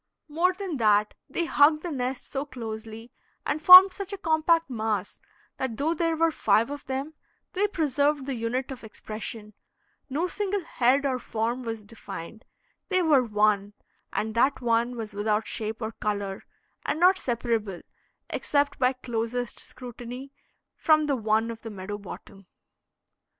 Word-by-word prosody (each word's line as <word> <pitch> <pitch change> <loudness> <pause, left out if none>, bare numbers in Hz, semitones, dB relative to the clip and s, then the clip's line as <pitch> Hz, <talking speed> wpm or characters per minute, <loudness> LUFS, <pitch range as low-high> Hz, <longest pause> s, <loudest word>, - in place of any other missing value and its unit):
More 335 +5 +2
than 370 -4 -5
that, 210 -2 +3 0.2
they 340 +5 -1
hugged 305 0 +4
the 350 - -3
nest 255 -2 -3
so 270 0 -2
closely 225 -3 -8 0.3
and 310 - -1
formed 370 +2 +11
such 395 0 -6
a 400 - -4
compact 330 -1 +2
mass, 220 -5 -3 0.4
that 250 -4 -3
though 315 +4 +1
there 330 0 0
were 330 +1 +2
five 225 -2 +2
of 290 0 -7
them, 270 +4 -3 0.4
they 405 +2 +2
preserved 290 -5 0
the 275 - -2
unit 245 +3 -2
of 260 -2 -8
expression, 215 0 -8 0.6
no 300 +6 0
single 405 0 -2
head 275 -2 +2
or 260 -2 0
form 235 +2 -2
was 225 -3 -5
defined; 210 -1 -9 0.4
they 370 -2 +2
were 300 -5 +5
one, 210 -3 +1 0.4
and 220 0 -2
that 260 +5 +2
one 235 0 +1
was 215 -2 -6
without 210 +1 0
shape 220 +1 -4
or 220 - -3
color, 205 -3 -3 0.4
and - - -2
not 370 +2 +5
separable, 230 -6 -2 0.5
except 285 -1 0
by 255 0 +3
closest 245 -1 -3
scrutiny, 250 +2 -9 0.4
from 310 -1 +3
the 285 -2 +1
one 220 0 +1
of 225 - -9
the 225 - -7
meadow 205 0 -6
bottom. 195 -1 -11
250 Hz, 155 wpm, -26 LUFS, 220-300 Hz, 0.6 s, formed